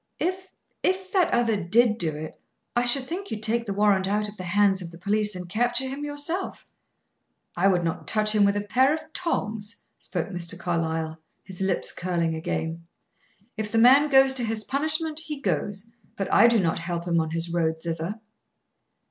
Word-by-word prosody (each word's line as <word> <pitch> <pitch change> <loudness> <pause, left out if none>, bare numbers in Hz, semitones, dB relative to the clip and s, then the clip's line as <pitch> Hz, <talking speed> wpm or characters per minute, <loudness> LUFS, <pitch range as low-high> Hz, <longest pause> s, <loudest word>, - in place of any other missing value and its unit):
"If 370 +2 -2 0.3
if 375 0 -1
that 370 -3 +3
other 235 -2 +2
did 220 +5 +3
do 160 -3 0
it, 155 +1 -8 0.3
I 240 +1 +2
should 255 +2 +4
think 375 +7 -5
you'd 215 0 -5
take 235 +1 0
the 200 - -1
warrant 200 -2 +3
out 210 +1 0
of 205 - -10
the 185 - -7
hands 195 +1 +2
of 175 - -7
the 170 - -12
police 210 +3 0
and 180 -1 -6
capture 240 +6 0
him 275 +2 -5
yourself." 295 +6 -3 0.9
"I 180 +3 +3
would 180 -3 +2
not 165 -1 -3
touch 215 0 +2
him 210 -1 +4
with 200 0 +3
a - - 0
pair 260 +8 +3
of 315 0 -11
tongs," 220 - -2
spoke 175 -2 -4
Mr. 175 -1 -4
Carlyle, 165 -2 -2 0.2
his 190 -1 -9
lips 190 -2 0
curling 170 -2 -1
again. 165 0 -4 0.7
"If 215 -1 -3
the 230 - 0
man 265 +6 +6
goes 270 -1 +6
to 255 -2 0
his 220 -1 -2
punishment, 310 +3 0
he 310 -2 -6
goes; 205 -4 -2 0.3
but 195 - -2
I 225 - +7
do 235 -1 +4
not 165 -4 0
help 170 0 -4
him 170 -1 +2
on 160 -1 -1
his 165 +1 -2
road 160 -2 0
thither." 165 +6 -4
210 Hz, 190 wpm, -25 LUFS, 175-255 Hz, 0.9 s, I